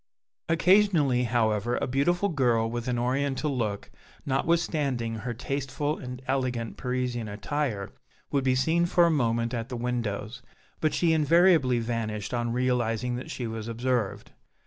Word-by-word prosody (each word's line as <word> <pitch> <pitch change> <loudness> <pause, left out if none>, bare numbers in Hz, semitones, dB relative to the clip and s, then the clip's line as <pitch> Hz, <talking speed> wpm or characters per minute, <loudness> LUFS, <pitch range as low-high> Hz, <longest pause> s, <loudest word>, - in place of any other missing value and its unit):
Occasionally, 165 -7 +4
however, 115 0 +1
a - - -1
beautiful 175 +10 +1
girl, 120 -7 +2
with 120 0 -4
an 125 -1 0
oriental 135 +3 0
look 105 -5 -3 0.3
notwithstanding 140 -5 0
her 120 +2 -4
tasteful 140 +4 -2
and 125 0 -7
elegant 130 -4 -1
Parisian 125 -3 -2
attire, 105 0 -3 0.4
would 140 -2 +1
be 130 -1 +2
seen 165 +6 +2
for 175 0 +4
a 170 - +3
moment 115 -4 0
at 115 0 -3
the 125 - -4
windows, 120 -1 -3 0.4
but 155 - +1
she 165 -2 +3
invariably 160 -4 +4
vanished 115 -2 -3
on 120 -1 -1
realizing 125 -1 0
that 125 - -7
she 125 - -4
was 110 -1 -5
observed. 115 -2 -2
125 Hz, 145 wpm, -27 LUFS, 115-140 Hz, 0.4 s, Occasionally